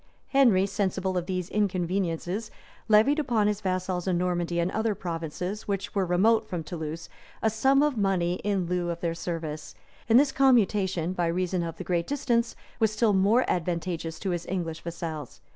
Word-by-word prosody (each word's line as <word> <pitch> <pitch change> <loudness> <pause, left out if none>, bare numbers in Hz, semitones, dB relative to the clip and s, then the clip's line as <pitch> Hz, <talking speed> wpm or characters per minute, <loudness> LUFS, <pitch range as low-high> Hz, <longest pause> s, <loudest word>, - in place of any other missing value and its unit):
Henry, 235 -9 +4
sensible 190 -2 -1
of 180 -1 -1
these 185 -2 -2
inconveniences, 185 0 -1 0.4
levied 220 +8 +5
upon 240 -8 +1
his 210 0 0
vassals 185 -2 -2
in 180 -2 +2
Normandy 175 -1 -1
and 170 +2 0
other 220 -1 0
provinces, 180 +2 -4
which 195 -1 -3
were 195 -3 0
remote 210 +6 +3
from 175 -4 -3
Toulouse, 160 0 -6 0.4
a 220 - +3
sum 265 +6 +3
of 290 -6 0
money 180 -3 +1
in 200 -3 0
lieu 175 0 -1
of 170 0 -4
their 170 -1 0
service; 165 -3 -5 0.3
and 230 +2 +7
this 280 0 +3
commutation, 200 -10 +2
by 175 -2 0
reason 180 +1 0
of 165 -1 -4
the - - -5
great 170 -2 -1
distance, 240 -5 0 0.2
was 220 -2 +3
still 215 0 +2
more 205 +6 +4
advantageous 170 -2 -2
to 190 - -1
his 175 -1 -3
English 170 -3 -3
vassals. 165 -5 -6
185 Hz, 175 wpm, -27 LUFS, 170-210 Hz, 0.4 s, and